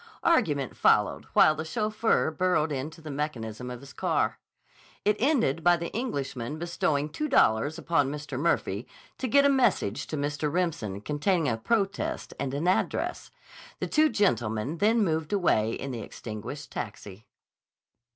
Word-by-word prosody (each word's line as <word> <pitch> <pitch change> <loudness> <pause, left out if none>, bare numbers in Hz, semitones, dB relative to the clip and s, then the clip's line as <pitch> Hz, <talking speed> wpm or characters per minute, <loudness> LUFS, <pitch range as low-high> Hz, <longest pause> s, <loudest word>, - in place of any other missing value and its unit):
Argument 150 - +2
followed - - +3
while 155 - +6
the 155 - -4
chauffeur 215 +1 +1
burrowed 160 -2 +1
into 150 +4 -5
the 155 -1 -7
mechanism 125 -5 -4
of 125 0 -7
his 140 -1 -12
car. - - 0 0.7
It 210 0 +4
ended 230 - +2
by 175 0 +5
the 170 0 -5
Englishman 145 - -3
bestowing 155 -3 0
two 305 - -3
dollars 145 - +3
upon 145 -5 +1
Mr. 145 -3 -5
Murphy 125 - 0 0.3
to 260 - -1
get 280 +4 +5
a - - +7
message 240 - +1
to 155 - -4
Mr. 145 +1 -1
Remsen 150 - -2
containing 155 - 0
a 115 - +1
protest 200 - -1
and 135 -2 -2
an 155 +5 -1
address. 185 - 0 0.5
The - - -1
two 310 0 +3
gentlemen 125 - 0
then 220 +3 +3
moved 160 -4 -1
away 115 - +2
in 140 - -4
the 120 -3 -5
extinguished 115 +9 -7
taxi. 105 -1 -7
155 Hz, 150 wpm, -28 LUFS, 130-185 Hz, 0.7 s, a